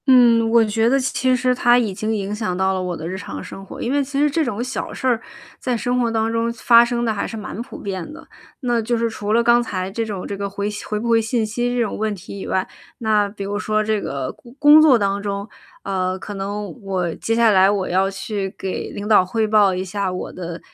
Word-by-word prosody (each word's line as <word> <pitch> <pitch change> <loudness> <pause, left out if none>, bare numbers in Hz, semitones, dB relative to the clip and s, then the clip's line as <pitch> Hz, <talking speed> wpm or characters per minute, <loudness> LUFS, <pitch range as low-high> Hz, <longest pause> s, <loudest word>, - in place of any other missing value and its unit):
嗯， 235 -3 +6
我 230 0 +5
觉 225 +2 +1
得 270 +2 +3
其 255 0 +1
实 255 0 +2
它 245 -1 +4
已 225 -5 0
经 215 +3 -2
影 200 0 -3
响 210 -4 -2
到 190 +1 +2
了 185 - -2
我 180 -2 -3
的 160 - -6
日 185 - -4
常 190 - -6
生 195 - -9
活。 195 - -10
因 240 - -2
为 285 0 +2
其 275 +1 -3
实 295 +1 +4
这 320 +3 +1
种 235 -5 -3
小 255 +1 -4
事 - - -7
儿， 245 -3 +2 0.4
在 250 -2 -1
生 245 +3 0
活 235 -1 +1
当 225 0 0
中 230 0 0
发 235 0 +6
生 240 0 -1
得 225 - +1
还 200 - -2
是 225 - -6
蛮 215 +1 -6
普 245 - -9
遍 190 - -5
的， 305 - -12 0.3
那 240 -3 +1
就 235 +2 0
是 230 0 +1
除 210 -1 -4
了 235 +1 +4
刚 240 +1 +5
才 190 -5 -3
这 230 +3 -2
种 205 -4 -5
这 200 - -4
个 200 0 -3
回 200 +1 -3
信 210 -1 -6
回 210 - -2
不 235 - -4
回 230 -1 +4
信 225 0 0
息 240 +3 -1
这 - - 0
种 220 - -3
问 215 0 0
题 195 +1 -9
以 - - -6
外， 185 - 0 0.3
那 215 -3 +1
比 200 0 -7
如 205 +1 -3
说 215 0 0
这 215 -1 0
个 135 -2 -3
工 240 0 -17
工 295 +1 +8
作 295 -5 +6
当 200 -1 0
中， 200 0 -3 0.4
呃， 185 -1 -1
可 205 +2 -7
能 205 +4 -5
我 185 -4 -2
接 225 - -1
下 230 -1 +5
来 190 -1 +5
我 200 -2 0
要 190 +2 +2
去 195 0 -4
给 190 - -4
领 205 +1 -6
导 210 -4 +6
汇 220 +4 0
报 210 -3 +4
一 185 +1 -3
下 195 0 -2
我 180 - -5
的 175 -2 -6
215 Hz, 280 characters per minute, -21 LUFS, 195-235 Hz, 0.4 s, 工